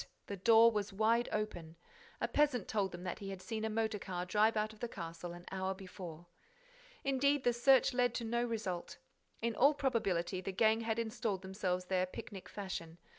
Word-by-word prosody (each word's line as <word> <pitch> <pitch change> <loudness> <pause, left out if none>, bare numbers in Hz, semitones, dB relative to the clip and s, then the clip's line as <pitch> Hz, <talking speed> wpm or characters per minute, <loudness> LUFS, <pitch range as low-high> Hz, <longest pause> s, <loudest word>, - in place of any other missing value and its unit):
The 200 - -5
door 225 +4 +6
was 210 -2 -2
wide 225 +4 +2
open. 175 -7 -3 0.4
A - - 0
peasant 285 -8 +2
told 200 -3 0
them 175 0 -8
that 185 - -4
he 200 -2 -6
had 195 -1 -5
seen 220 +3 -4
a 220 - 0
motor 220 -1 -1
car 180 -2 -4
drive 215 +4 +3
out 215 +1 0
of 215 - -17
the 240 - -2
castle 170 -3 -6
an 175 0 -10
hour 190 0 -2
before. 180 -3 -9 0.8
Indeed, 275 +1 +2
the 245 - +3
search 255 +2 +5
led 245 -1 +2
to 235 - -2
no 235 +1 0
result. 215 -7 -3 0.5
In 235 0 +1
all 285 +4 +5
probability, 195 -10 0
the 195 - -3
gang 220 +3 +3
had 225 0 -1
installed 220 -4 -2
themselves 190 -1 -2
there 185 0 +1
picnic 190 +1 -8
fashion. 170 -5 -5
210 Hz, 190 wpm, -35 LUFS, 185-230 Hz, 0.8 s, door